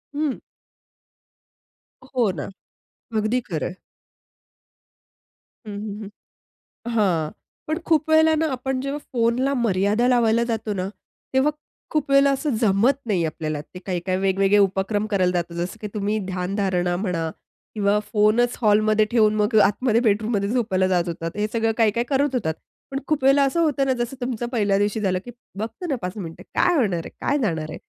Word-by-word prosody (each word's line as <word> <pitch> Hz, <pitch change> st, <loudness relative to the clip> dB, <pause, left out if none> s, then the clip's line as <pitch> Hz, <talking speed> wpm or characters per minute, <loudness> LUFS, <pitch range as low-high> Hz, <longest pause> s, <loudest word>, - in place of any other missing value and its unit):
हं. 295 Hz, -3 st, -1 dB, 1.7 s
हो 250 Hz, -6 st, 0 dB
ना. 160 Hz, -1 st, -6 dB, 0.7 s
अगदी 215 Hz, +4 st, +1 dB
खरंय. 175 Hz, +2 st, -3 dB, 1.9 s
हं, 205 Hz, -, -5 dB
हं, 210 Hz, 0 st, -6 dB
हं. 200 Hz, -, -8 dB, 0.8 s
हां. 175 Hz, -8 st, +1 dB, 0.4 s
पण 315 Hz, +2 st, -1 dB
खूप 315 Hz, -1 st, +2 dB
वेळेला 315 Hz, 0 st, +5 dB
ना 320 Hz, +1 st, +1 dB
आपण 255 Hz, +1 st, -2 dB
जेव्हा 275 Hz, +2 st, -3 dB
फोनला 245 Hz, +3 st, +1 dB
मर्यादा 215 Hz, 0 st, +1 dB
लावायला 235 Hz, -2 st, +3 dB
जातो 225 Hz, -2 st, -2 dB
ना, 185 Hz, 0 st, -2 dB, 0.5 s
तेव्हा 265 Hz, +3 st, +4 dB, 0.4 s
खूप 305 Hz, -3 st, -1 dB
वेळेला 275 Hz, 0 st, +5 dB
असं 275 Hz, -1 st, 0 dB
जमत 225 Hz, +6 st, +3 dB
नाही 185 Hz, -6 st, +1 dB
आपल्याला. 155 Hz, -1 st, -3 dB
ते 170 Hz, +4 st, -11 dB
काही-काही 185 Hz, 0 st, -1 dB
वेगवेगळे 195 Hz, +1 st, +3 dB
उपक्रम 200 Hz, +2 st, +1 dB
करायला 185 Hz, -3 st, +2 dB
जातो 170 Hz, -1 st, -2 dB
जसं, 175 Hz, +5 st, -3 dB
की 215 Hz, -, -4 dB
तुम्ही 210 Hz, +1 st, 0 dB
ध्यानधारणा 180 Hz, -1 st, -1 dB
म्हणा 175 Hz, -5 st, -2 dB, 0.4 s
किंवा 205 Hz, 0 st, +2 dB
फोनच 220 Hz, +3 st, +3 dB
हॉलमध्ये 215 Hz, 0 st, +4 dB
ठेऊन 215 Hz, -3 st, +4 dB
मग 210 Hz, +2 st, 0 dB
आतमध्ये 230 Hz, +2 st, +2 dB
बेडरूममध्ये 215 Hz, -2 st, +1 dB
झोपायला 215 Hz, -6 st, +1 dB
जात 175 Hz, -2 st, +2 dB
होतात. 165 Hz, 0 st, -4 dB
हे 210 Hz, 0 st, 0 dB
सगळं 225 Hz, -1 st, +1 dB
काही-काही 230 Hz, +1 st, +2 dB
करत 280 Hz, -1 st, +1 dB
होतात. 160 Hz, -10 st, 0 dB, 0.4 s
पण 275 Hz, -, -2 dB
खूप 305 Hz, -3 st, 0 dB
वेळेला 275 Hz, +1 st, +5 dB
असं 275 Hz, +5 st, +1 dB
होतं 275 Hz, -4 st, +2 dB
जसं 240 Hz, +3 st, -3 dB
तुमचं 245 Hz, -1 st, -2 dB
पहिल्या 205 Hz, -4 st, +2 dB
दिवशी 205 Hz, +2 st, 0 dB
झालं, 185 Hz, -3 st, +1 dB
की 245 Hz, -, -8 dB, 0.3 s
"बघतो 230 Hz, -, -5 dB
ना 275 Hz, -, 0 dB
5 180 Hz, +3 st, -4 dB
मिनिटं. 165 Hz, -5 st, -7 dB
काय 355 Hz, -, +3 dB
होणार 200 Hz, -, +1 dB
आहे? -, -, -7 dB
काय 290 Hz, -, +1 dB
जाणार 160 Hz, -, -1 dB
आहे?" -, -, -7 dB
215 Hz, 160 wpm, -23 LUFS, 190-250 Hz, 1.9 s, वेळेला